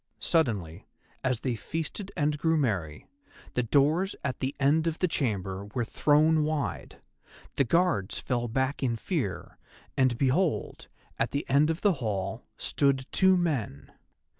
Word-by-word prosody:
Suddenly, 105 Hz, -, 0 dB, 0.4 s
as 125 Hz, -3 st, 0 dB
they 130 Hz, -, -1 dB
feasted 165 Hz, -, -5 dB
and 150 Hz, -1 st, +1 dB
grew 160 Hz, +1 st, +2 dB
merry, 95 Hz, -, -1 dB, 0.5 s
the 125 Hz, -, +1 dB
doors 150 Hz, -, +2 dB
at 130 Hz, -3 st, -2 dB
the 130 Hz, +2 st, -2 dB
end 150 Hz, +4 st, +3 dB
of 165 Hz, 0 st, -1 dB
the 180 Hz, -, +1 dB
chamber 100 Hz, -, -2 dB
were 120 Hz, -2 st, 0 dB
thrown 155 Hz, +5 st, +3 dB
wide, 155 Hz, -1 st, -3 dB, 0.6 s
the 140 Hz, -, +3 dB
Guards 165 Hz, -, +1 dB
fell 120 Hz, -2 st, -1 dB
back 130 Hz, +4 st, -1 dB
in 125 Hz, -4 st, +1 dB
fear, 115 Hz, -, -3 dB, 0.4 s
and 130 Hz, -3 st, +2 dB
behold, 145 Hz, +6 st, 0 dB, 0.3 s
at -, -, +1 dB
the 140 Hz, +1 st, -3 dB
end 145 Hz, +3 st, +4 dB
of 165 Hz, +2 st, -2 dB
the 205 Hz, -2 st, +4 dB
hall, 105 Hz, 0 st, -2 dB, 0.2 s
stood 135 Hz, -2 st, +1 dB
two 190 Hz, -1 st, +4 dB
men. 115 Hz, -, -2 dB
135 Hz, 145 wpm, -28 LUFS, 115-160 Hz, 0.6 s, end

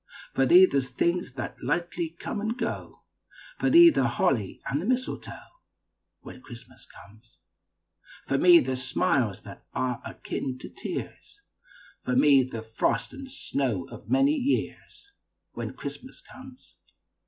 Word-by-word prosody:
For 135 Hz, 0 st, +2 dB
thee, 180 Hz, +5 st, +8 dB
the 140 Hz, -6 st, +1 dB
things 135 Hz, +5 st, -1 dB
that 130 Hz, -2 st, -6 dB
lightly 170 Hz, +4 st, -1 dB
come 205 Hz, -, -4 dB
and 220 Hz, +3 st, -2 dB
go, 230 Hz, -1 st, -5 dB, 0.6 s
For -, -, +2 dB
thee, 340 Hz, 0 st, +9 dB
the 130 Hz, -, +1 dB
holly 120 Hz, -3 st, 0 dB
and 140 Hz, +2 st, -1 dB
the -, -, -5 dB
mistletoe, 255 Hz, +1 st, -3 dB, 0.8 s
When 255 Hz, -, -11 dB
Christmas 120 Hz, -, -14 dB
comes. 110 Hz, +2 st, -18 dB, 0.9 s
For 135 Hz, -, 0 dB
me, 175 Hz, -1 st, +7 dB
the 130 Hz, +1 st, -2 dB
smiles 125 Hz, -4 st, 0 dB
that -, -, -12 dB
are 125 Hz, -2 st, -1 dB
akin 130 Hz, -1 st, -5 dB
to -, -, -10 dB
tears, -, -, -7 dB, 0.6 s
For 125 Hz, -, -1 dB
me, 140 Hz, 0 st, +6 dB
the 120 Hz, -3 st, -5 dB
frost 110 Hz, 0 st, -1 dB
and 270 Hz, -1 st, -9 dB
snows 130 Hz, -, -3 dB
of -, -, -11 dB
many 275 Hz, +2 st, +4 dB
years, 295 Hz, +7 st, -3 dB, 0.4 s
When -, -, -5 dB
Christmas -, -, -9 dB
comes. 260 Hz, -, -15 dB
140 Hz, 140 wpm, -27 LUFS, -, 0.9 s, thee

